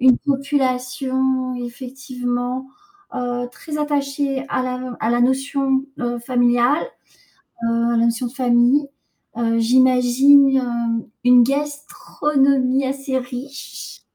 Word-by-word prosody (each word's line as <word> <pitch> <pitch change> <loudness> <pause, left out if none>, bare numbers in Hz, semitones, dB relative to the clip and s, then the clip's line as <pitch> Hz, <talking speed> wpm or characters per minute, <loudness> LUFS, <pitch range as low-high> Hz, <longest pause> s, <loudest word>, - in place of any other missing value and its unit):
une 255 -1 +5
population 260 -2 -1
effectivement, 250 0 -5 0.5
heu, 245 0 -3
très 300 +4 -7
attachée 280 -2 -1
à - - -1
la 255 -1 -5
à 225 - 0
la 240 0 +1
notion, 270 +1 0 0.2
heu, 240 0 -2
familiale, 245 +3 +2 0.8
heu, - - +1 0.2
à 235 - +1
la 230 - +3
notion 235 +2 -1
de - - -15
famille. 255 +2 +2 0.5
Heu, 230 -1 +1
j'imagine 260 +3 +5
hem, 235 -2 -2 0.2
une 250 0 +7
gastronomie 275 -1 0
assez 270 0 -2
riche. 255 +2 -8
255 Hz, 110 wpm, -20 LUFS, 245-275 Hz, 0.8 s, une